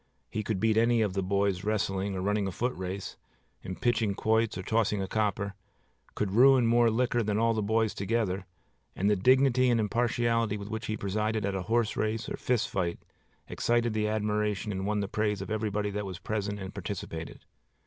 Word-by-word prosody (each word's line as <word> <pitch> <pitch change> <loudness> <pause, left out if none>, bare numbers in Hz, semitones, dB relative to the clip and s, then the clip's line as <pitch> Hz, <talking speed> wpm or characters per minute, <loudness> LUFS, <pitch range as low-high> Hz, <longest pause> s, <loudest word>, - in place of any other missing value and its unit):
He 110 - -2
could 105 -2 -2
beat 110 +1 +2
any 115 0 +4
of 100 -3 -1
the 95 - 0
boys 100 0 0
wrestling 100 -2 -1
or 95 - -3
running 105 0 +1
a - - -2
footrace, 95 -3 -4 0.4
in 95 - -6
pitching 115 -3 +1
quoits 110 -1 +1
or 95 - -4
tossing 110 0 +1
a 95 - -2
copper; 100 -1 -1 0.6
could 100 -3 -1
ruin 130 +3 +6
more 120 0 +4
liquor 120 +1 +1
than 105 -1 0
all 115 +1 +3
the 110 - -1
boys 110 +1 +1
together; 100 -3 -1 0.5
and 100 +3 +2
the - - +4
dignity 130 +4 +4
and 120 -1 +3
impartiality 115 0 +1
with 100 0 -7
which 110 0 -4
he 110 - -2
presided 105 +2 -1
at 100 - -1
a 95 - -2
horse 115 -1 +1
race 110 +1 -1
or - - -3
fist 120 -2 0
fight 85 -3 -1 0.5
excited 120 -1 +1
the 105 0 0
admiration 105 -1 -1
and 95 0 -3
won 105 0 0
the 100 - -2
praise 105 0 -1
of 100 +3 -6
everybody 105 -1 -1
that 105 0 -3
was 95 -2 -6
present 100 +2 -3
and 95 -1 -7
participated. 85 -4 -6
105 Hz, 195 wpm, -29 LUFS, 100-115 Hz, 0.6 s, ruin